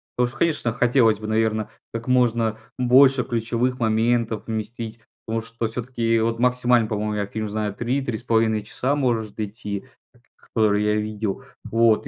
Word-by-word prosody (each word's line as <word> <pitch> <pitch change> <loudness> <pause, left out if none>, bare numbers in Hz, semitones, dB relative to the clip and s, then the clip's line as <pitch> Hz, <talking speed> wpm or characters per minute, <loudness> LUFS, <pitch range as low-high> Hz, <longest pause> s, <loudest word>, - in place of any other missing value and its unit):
Потому 125 0 +2
что, 120 - -10
конечно, 145 -8 +1
хотелось 120 -3 +3
бы, 110 - -6
наверно, 110 -1 0 0.2
как 115 +2 -5
можно 115 -3 +2 0.2
больше 130 +1 +5
ключевых 120 +2 -1
моментов 115 0 +1
вместить, 115 +1 -5 0.3
потому 115 0 -2
что 115 0 -4
все-таки, 115 -1 -1
вот, 115 +1 0
максимально, 125 -2 +3
по-моему, 105 0 -2
я 105 -1 -1
фильм 110 +1 -4
знаю 105 -1 -2
3-3.5 115 -3 0
часа 130 +6 -1
может 115 -6 -1
идти, 105 0 -4 0.5
которые 105 -2 +1
я 105 0 +2
видел. 105 -1 -3 0.2
Вот, 115 -1 +3
115 Hz, 145 wpm, -23 LUFS, 110-120 Hz, 0.5 s, больше